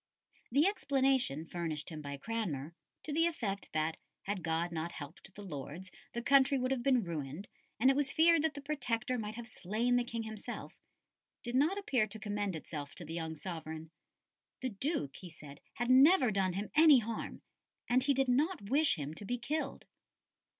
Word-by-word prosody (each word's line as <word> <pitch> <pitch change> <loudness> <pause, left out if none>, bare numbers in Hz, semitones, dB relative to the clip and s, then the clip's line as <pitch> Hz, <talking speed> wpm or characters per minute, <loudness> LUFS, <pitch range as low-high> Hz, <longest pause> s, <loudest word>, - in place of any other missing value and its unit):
The 285 +6 +4
explanation 270 - +2
furnished 165 -2 -4
him 155 -1 -6
by 140 -1 -5
Cranmer 170 -6 -3 0.3
to 300 - -4
the 330 +2 +4
effect 205 -12 -3
that, 155 +1 0 0.3
had 200 -1 -2
God 165 +1 0
not 170 +1 -3
helped 155 +6 -9
the 205 - -8
Lords, 165 +2 -7 0.2
the 235 - -3
country 275 +1 +5
would 255 0 0
have 265 -2 0
been 255 -2 +3
ruined, 160 +1 -5 0.3
and 260 +4 +6
it - - 0
was 280 -1 +1
feared 330 +2 +5
that 320 -1 0
the 285 - -7
Protector 250 -4 -1
might 215 0 -4
have 235 0 -7
slain 225 +4 0
the 245 - +2
King 230 -1 -4
himself 220 -1 -7 0.7
did 240 - -4
not 300 +9 +3
appear 260 - +1
to 220 - -7
commend 205 -3 -2
itself 150 -2 -6
to 175 - -7
the 160 - -6
young 160 -1 -3
sovereign. 160 -1 -6 0.7
The 260 - -1
Duke, 205 - -2
he 180 - -9
said, 150 -3 -12
had 240 +2 0
never 265 -1 +7
done 190 -2 +1
him 200 +3 -4
any 310 -2 +8
harm, 230 -1 -4 0.4
and 250 +1 +4
he 275 +1 +2
did 270 0 +2
not 260 - +1
wish 295 +1 +4
him 150 -2 -5
to 185 - -9
be 245 +5 -2
killed. 275 +3 -3
220 Hz, 185 wpm, -33 LUFS, 165-270 Hz, 0.7 s, any